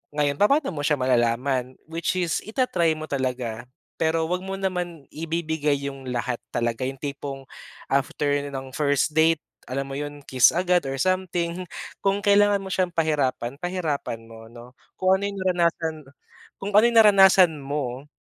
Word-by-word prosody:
Ngayon, 145 -1 0
papa'no 275 - +3
mo 145 - -4
siya 150 0 +1
malalaman? 125 +1 0
Which 165 +3 -2
is 175 -3 0
ita-try 185 - 0
mo 155 - -5
talaga, 125 -5 -3 0.3
pero 160 0 +1
huwag 180 +2 -2
mo 190 +1 -5
naman 180 -5 -3
ibibigay 160 -2 -1
yung 135 -2 -6
lahat 120 0 -2
talaga, 115 +1 -2
yung 135 - -5
tipong 140 -1 -6 0.5
after 145 +1 +1
ng 135 -1 -7
first 145 +1 +1
date, 160 0 +3 0.3
alam 135 +2 -2
mo 135 - -7
'yon, 145 0 -6
kiss 130 -2 +5
agad 180 +1 +2
or 135 - -3
something. 180 +1 -1 0.4
Kung 200 0 0
kailangan 205 0 +5
mo 190 0 -4
siyang 185 -1 +1
pahirapan, 150 -7 0
pahirapan 155 -10 -3
mo 115 0 -13
'no. 120 +1 -13 0.2
Kung 185 0 +3
ano - - -5
yung 200 - -7
naranasan, 170 -3 +1 0.6
kung 200 +1 -5
ano 210 +3 +7
yung 235 - +1
naranasan 190 -4 +7
mo 135 -1 -4
155 Hz, 160 wpm, -24 LUFS, 135-180 Hz, 0.6 s, ano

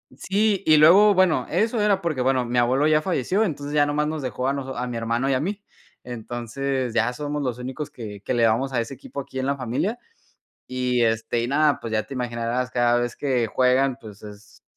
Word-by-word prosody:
sí, 200 0 0
y 155 -1 +6
luego, 195 +7 +7
bueno, 185 -3 +3
eso 225 0 0
era 200 -2 +2
porque, 155 -7 -2
bueno, 130 -1 +1
mi 120 +1 -2
abuelo 130 +5 +3
ya 155 0 +3
falleció, 185 - 0
entonces 145 -5 -4
ya 145 -1 +4
nomás 150 +1 0
nos 155 -1 -3
dejó 130 0 -3
a 135 - +1
nos 135 -1 -5
a 125 +1 -3
mi 120 - -5
hermano 115 +4 -1
y - - +2
a 130 - +1
mí. 195 +6 -3 0.4
Entonces 120 +2 -4
ya - - +1
somos 145 +2 -4
los 125 -2 -2
únicos 130 +4 -5
que 105 -4 -9
que - - -3
le 115 -2 +3
vamos 130 +5 0
a 120 - 0
ese 115 +4 -4
equipo 140 +1 -8
aquí 130 -1 -8
en 130 - -1
la 140 0 0
familia, 135 - -2 0.7
y, 125 -1 0
este, 115 +1 0
y - - -1
nada, 150 +1 +2
pues, 115 -1 -7
ya 110 -1 +1
te 110 - -10
imaginarás, 120 0 -2
cada 120 -1 +2
vez 120 0 -2
que 130 -5 0
juegan, 130 +2 +2
pues 105 -4 -12
es 105 0 -13
130 Hz, 225 wpm, -23 LUFS, 120-150 Hz, 0.7 s, luego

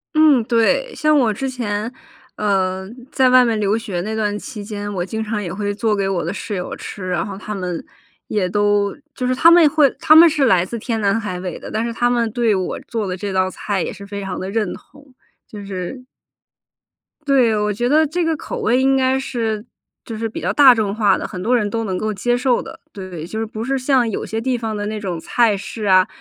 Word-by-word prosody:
嗯， 305 -6 +5
对， 350 - +1
像 305 -1 +3
我 235 -6 +3
之 265 +5 -3
前， 225 -3 -3 0.4
呃， 190 -2 0 0.2
在 260 -1 +3
外 255 0 +7
面 225 -2 0
留 205 +1 +1
学 205 -6 -4
那 215 +4 -4
段 210 -1 -1
期 215 -3 -8
间， 205 0 -5
我 175 -1 -2
经 220 +3 -4
常 210 -1 -3
也 175 -4 -5
会 205 +1 -2
做 210 +1 0
给 195 -1 -1
我 190 -3 -1
的 - - -3
室 205 0 -5
友 180 -1 -4
吃。 190 -3 -7
然 175 -2 -1
后 195 -1 -7
她 210 - -6
们 180 -4 -4 0.4
也 205 -4 0
都 205 0 +1 0.2
就 250 - -3
是 255 - +1
她 330 +5 +6
们 335 -2 +7
会 295 -1 +4
她 310 - +5
们 335 +1 +9
是 295 -3 +1
来 185 -7 +3
自 235 +4 -6
天 225 0 -2
南 200 +2 +2
海 185 -5 -4
北 180 -1 -5
的， - - -9
但 225 +2 -1
是 235 - -3
她 240 +1 +1
们 235 -2 +1
对 230 -2 +1
我 185 -1 -3
做 225 -3 -2
的 185 - -3
这 200 +1 -4
道 185 0 +1
菜 195 0 -3
也 - - -4
是 200 - -11
非 200 0 -5
常 190 -1 -4
地 190 - -4
认 210 -3 -1
同， 285 -1 -16 0.3
就 205 -2 -9
是 195 +6 -6 1.2
对， 250 -6 +3
我 210 0 0
觉 240 +4 -1
得 310 +2 +4
这 345 +4 -1
个 325 -2 0
口 - - -6
味 245 +3 +2
应 270 0 +3
该 265 0 +2
是 225 -5 -3 0.4
就 225 - -6
是 225 +1 -3
比 - - -6
较 - - -1
大 275 -4 +8
众 210 -3 -1
化 215 -2 +3
的， - - -4
很 180 - -7
多 235 +5 +1
人 210 -3 -1
都 225 +2 -2
能 190 -4 -2
够 215 +3 -2
接 240 +5 0
受 250 -1 +1
的， - - -10
对。 185 -5 -7
就 220 - -6
是 225 - -1
不 220 +1 -6
是 270 +1 0
像 255 -2 +2
有 215 - -3
些 220 - -3
地 250 +2 -1
方 225 -2 -3
的 205 - -3
那 215 +1 -3
种 185 -5 -4
菜 220 +4 +2
式 215 +3 -7
啊， 185 -1 +5
215 Hz, 260 characters per minute, -19 LUFS, 200-250 Hz, 1.2 s, 们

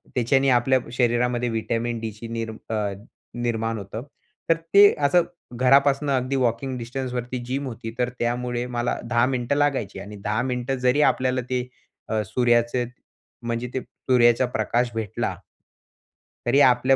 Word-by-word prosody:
त्याच्याने 135 +2 +3
आपल्या 130 +1 +4
शरीरामध्ये 120 0 +1
व्हिटॅमिन 115 +1 -2
डीची 110 0 -6
निर्मी 115 -1 -4 0.2
अ, 105 -2 -1 0.5
निर्माण 115 -1 -1
होतं. 105 +3 -6 0.5
तर 165 - +6 0.2
ते 200 0 +8
असं 175 +4 +4 0.4
घरापासून 140 +2 +4
अगदी 130 0 0
वॉकिंग 125 +1 0
डिस्टन्सवरती 125 0 -4
जिम 135 +2 -3
होती. 115 -1 -6
तर 125 0 +1
त्यामुळे 120 0 -1
मला 120 - -1
10 120 0 +2
मिनिटं 130 +1 -1
लागायची 135 -10 0
आणि 105 +2 -8
10 110 +2 0
मिनिट 125 0 -2
जरी 125 +2 +2
आपल्याला 130 0 -1
ते 125 -1 -1 0.4
अ, 110 -1 +1
सूर्याचे 120 +2 +2 0.6
म्हणजे 120 +1 -2
ते 130 - 0
सूर्याचा 120 -1 +2
प्रकाश 120 +3 +1
भेटला 110 -3 -2 1.1
तरी 125 +4 +4
आपल्या 130 +1 +4
125 Hz, 140 wpm, -24 LUFS, 115-130 Hz, 1.1 s, ते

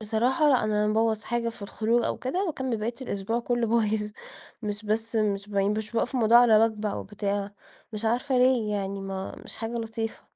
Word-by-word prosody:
بصراحة 240 +8 +2
لأ، 260 -5 +4
أنا 210 -1 +1
لمّا 210 0 +1
بابوظ 220 -1 +1
حاجة 235 +1 -1
في 230 -3 -8
الخروج 225 +3 0
أو - - -1
كده 360 +10 -1
باكمِّل 265 -7 -2
باقية 220 +3 -3
الأسبوع 225 +1 -2
كلّه 240 0 0
بايظ، 215 -2 +1 0.5
مش 205 0 -4
بس 225 +2 -1
مش 205 -2 0
ب 205 - -6
مش 210 +2 0
باوقّف 235 +3 -1
الموضوع 235 -1 +6
على 235 -3 +6
وجبة 215 -1 -1
أو - - -4
بتاع، 200 0 -3 0.4
مش 215 +1 -5
عارفة 250 +4 +1
ليه 250 -4 +3
يعني، 195 0 -3
ما 195 0 -5
مش - - -9
حاجة 225 +1 -4
لطيفة. 225 -1 -4
220 Hz, 195 wpm, -27 LUFS, 210-235 Hz, 0.5 s, الموضوع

